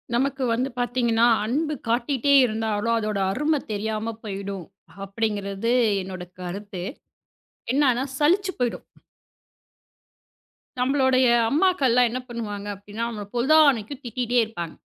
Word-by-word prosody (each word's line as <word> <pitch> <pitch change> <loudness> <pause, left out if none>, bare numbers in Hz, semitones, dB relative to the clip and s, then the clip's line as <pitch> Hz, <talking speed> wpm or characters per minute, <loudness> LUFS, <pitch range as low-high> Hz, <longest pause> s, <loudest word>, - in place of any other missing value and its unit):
நமக்கு 270 +2 0
வந்து 250 +4 0
பாத்தீங்கன்னா, 240 -2 +2 0.2
அன்பு 300 +7 -1
காட்டிட்டே 255 +4 +1
இருந்தாலும் 220 0 -1
அதோட 215 -2 -2
அருமை 295 +7 +1
தெரியாம 215 +2 -2
போயிடும் 195 -3 -5 0.4
அப்படிங்கிறது 205 +1 -2 0.3
என்னோட 185 -1 -7 0.2
கருத்து. 185 0 -6 0.9
என்னன்னா, 260 -3 +3 0.2
சலிச்சுப் 375 +6 +2
போயிடும். 245 -2 -2 1.9
நம்மளோட 260 0 +2 0.4
அம்மாக்கள்லாம் 275 -8 +3
என்ன 250 +3 -3
பண்ணுவாங்க 210 -4 -5
அப்படின்னா, 205 +3 -7
நம்மள 210 -3 -6
பொழுதானைக்கும் 280 -2 +3
திட்டிட்டே 245 +1 0
இருப்பாங்க. 175 -7 -6
230 Hz, 100 wpm, -24 LUFS, 205-265 Hz, 1.9 s, என்னன்னா